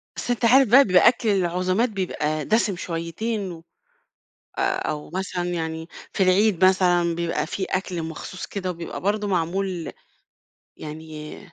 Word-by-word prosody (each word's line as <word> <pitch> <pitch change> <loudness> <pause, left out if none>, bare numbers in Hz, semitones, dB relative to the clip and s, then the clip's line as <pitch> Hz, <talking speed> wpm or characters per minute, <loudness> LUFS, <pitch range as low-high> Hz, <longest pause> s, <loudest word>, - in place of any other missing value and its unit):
بس - - -5
أنت 240 0 0
عارف 260 +3 +6
بقى، 270 +5 +8
بيبقى 180 -2 +5
أكل 235 -1 +3
العزومات 185 +4 +1
بيبقى 155 -7 -2
دسم 215 -3 +2
شويتين، 180 +5 -3
و 165 -1 -10 1.0
أو 150 -1 -1
مثلًا 185 -1 -2
يعني، 160 -1 -3 0.3
في 195 - +2
العيد 185 0 +4
مثلًا، 175 -2 +3
بيبقى 165 -3 -1
فيه 190 +2 -3
أكل 185 -3 -2
مخصوص 160 +3 -6
كده 185 -2 -4
وبيبقى 170 -1 -6
برضه 205 +2 0
معمول 180 -1 -1 0.9
يعني، 155 0 -8
185 Hz, 135 wpm, -24 LUFS, 165-200 Hz, 1.0 s, بقى